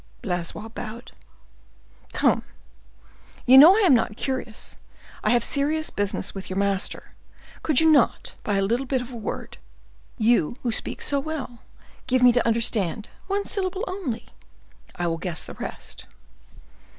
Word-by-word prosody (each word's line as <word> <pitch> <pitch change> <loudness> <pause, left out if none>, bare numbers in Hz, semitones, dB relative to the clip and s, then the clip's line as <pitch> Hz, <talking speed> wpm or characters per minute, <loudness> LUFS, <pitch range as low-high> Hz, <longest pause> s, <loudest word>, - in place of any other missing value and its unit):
Blaisois 180 +4 -3
bowed. 225 +2 -8 1.0
"Come, - - +2 1.0
you 255 - +7
know 310 +8 +10
I - - +3
am 365 -9 +6
not 225 -2 +1
curious—I 255 -4 -5
have 240 -1 +3
serious 305 +4 0
business 205 -1 -3
with 195 -1 -8
your 185 - -4
master. 200 -1 -2 0.5
Could 305 -5 +3
you 320 - +4
not, 280 -6 +2
by 205 - 0
a 195 - +2
little 235 +7 0
bit 260 -1 0
of 250 - -11
a - - -8
word—you 150 - -3
who 240 - 0
speak - - -3
so 280 - +1
well—give 260 -3 -4
me 250 - +8
to 240 0 +1
understand—one 230 - -1
syllable 380 -1 -2
only—I 270 - -8
will 165 -1 -1
guess 175 -3 -3
the - - -9
rest." - - -8
235 Hz, 135 wpm, -24 LUFS, 200-280 Hz, 1.0 s, know